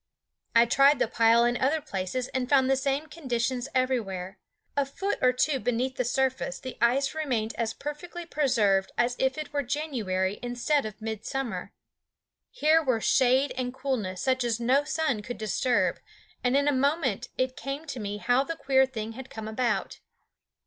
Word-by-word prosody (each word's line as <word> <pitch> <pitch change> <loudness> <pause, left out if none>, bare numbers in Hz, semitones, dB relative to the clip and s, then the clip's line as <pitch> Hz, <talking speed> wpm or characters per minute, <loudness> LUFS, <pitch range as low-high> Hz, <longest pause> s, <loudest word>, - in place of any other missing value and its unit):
I 230 +1 +7
tried 275 +4 +5
the - - +1
pile 230 +1 +4
in 240 0 +1
other 290 +5 +2
places 245 -2 -3
and 255 -1 -2
found 270 -2 +4
the - - +5
same 275 +2 -1
conditions 255 -5 -2
everywhere. 205 -8 -1 0.4
A 285 - +3
foot 385 +9 -3
or 255 - +5
two 265 +2 +1
beneath 245 +3 -1
the 250 - +1
surface 260 +2 -1
the 260 - -7
ice 265 +4 +2
remained 250 -8 -1
as 230 -2 -2
perfectly 340 +4 -6
preserved 225 -12 +2
as 240 +1 +2
if 265 +1 +1
it 305 -1 -6
were 285 - +1
January 230 -10 -2
instead 245 +2 0
of 215 +1 -11
midsummer. 225 +3 -4 0.8
Here 325 -9 +3
were 255 -7 +1
shade 260 +4 +3
and 250 0 -3
coolness 245 -9 -2
such 260 -1 +1
as 235 -1 0
no 260 +5 +2
sun 290 -10 0
could 240 +4 -6
disturb, 220 +3 +1 0.4
and 250 +2 +3
in 285 0 +2
a - - +5
moment 275 - 0
it 255 0 0
came 275 +4 -5
to 280 -5 -6
me 205 -1 -4
how 245 +5 +2
the 330 +4 -4
queer 265 -3 +3
thing 225 -4 -5
had 260 +3 -9
come 220 -1 -7
about. 235 +2 -1
255 Hz, 175 wpm, -27 LUFS, 230-275 Hz, 0.8 s, I